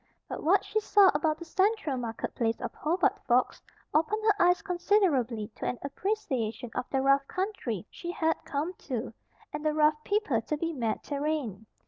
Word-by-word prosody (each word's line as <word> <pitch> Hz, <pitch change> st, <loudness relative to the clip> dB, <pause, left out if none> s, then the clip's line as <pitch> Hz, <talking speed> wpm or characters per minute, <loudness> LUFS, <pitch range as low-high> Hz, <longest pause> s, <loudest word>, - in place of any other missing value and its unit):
But -, -, -5 dB
what 370 Hz, +6 st, +3 dB
she 435 Hz, -, 0 dB
saw 410 Hz, -2 st, +5 dB
about 310 Hz, -2 st, +1 dB
the 340 Hz, -, -9 dB
central 385 Hz, -4 st, +1 dB
market 235 Hz, -3 st, -4 dB
place 225 Hz, -1 st, 0 dB
of -, -, -5 dB
Hobart 340 Hz, +4 st, +1 dB
Forks 250 Hz, +1 st, +2 dB, 0.3 s
opened 405 Hz, +8 st, +1 dB
her 415 Hz, -4 st, +4 dB
eyes 355 Hz, -1 st, +3 dB
considerably 310 Hz, -, +1 dB
to -, -, -3 dB
an 250 Hz, -, -1 dB
appreciation 265 Hz, -, -2 dB
of 250 Hz, -, -3 dB
the 265 Hz, -1 st, 0 dB
rough 275 Hz, 0 st, +4 dB
country 370 Hz, -, -3 dB
she 345 Hz, -, -7 dB
had 320 Hz, -2 st, 0 dB
come 300 Hz, +6 st, -2 dB, 0.2 s
to, 240 Hz, -2 st, -3 dB, 0.4 s
and 295 Hz, 0 st, -4 dB
the 305 Hz, -1 st, +1 dB
rough 305 Hz, 0 st, +3 dB
people 405 Hz, -, +1 dB
to 300 Hz, +6 st, -3 dB
be 330 Hz, +2 st, -2 dB
met 230 Hz, -6 st, -2 dB
therein. 280 Hz, -8 st, -3 dB
300 Hz, 175 wpm, -29 LUFS, 250-360 Hz, 0.4 s, saw